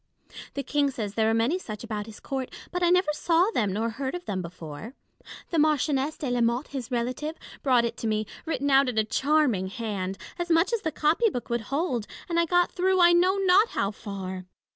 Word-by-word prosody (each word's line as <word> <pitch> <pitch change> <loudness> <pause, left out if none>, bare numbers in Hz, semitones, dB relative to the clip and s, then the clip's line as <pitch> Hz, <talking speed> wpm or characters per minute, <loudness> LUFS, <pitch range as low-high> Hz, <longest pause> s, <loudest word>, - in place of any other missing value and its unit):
The 280 - -2
King 290 0 +1
says 215 -6 -4
there 220 +1 +2
are - - +2
many 240 +11 +1
such 215 - -7
about 215 -2 -4
his 220 - -11
court; 265 -2 -4 0.2
but 360 - -2
I 350 - +4
never 360 -3 +3
saw 345 +6 +2
them 210 - 0
nor 225 +4 -1
heard 265 +6 -4
of 355 0 -7
them 185 -2 -2
before. 170 - -8 0.6
The 335 - +2
Mar 305 0 +5
chioness 285 +1 -1
de 275 -4 -3
la 245 -1 +1
Motte, 235 +4 +1
his 265 -5 -5
relative, 255 +6 -2 0.2
brought 250 -4 +3
it 235 - -4
to 225 - -3
me, 215 0 0 0.2
written 285 -3 0
out 270 -1 +5
in 235 - -4
a 220 - +4
charming 260 -4 +1
hand, 195 -2 -4 0.2
as 350 0 -2
much 330 +6 +3
as 460 - +1
the 315 - -2
copy 320 +11 +2
book 245 -9 -5
would 235 -1 0
hold; 275 - -1 0.2
and 340 -1 +1
I 335 - +2
got 355 +1 +3
through, 375 +1 +1
I 345 -1 +7
know 365 +2 +4
not 390 +3 +4
how 200 - +1
far. 190 -4 -6
265 Hz, 225 wpm, -27 LUFS, 220-335 Hz, 0.6 s, I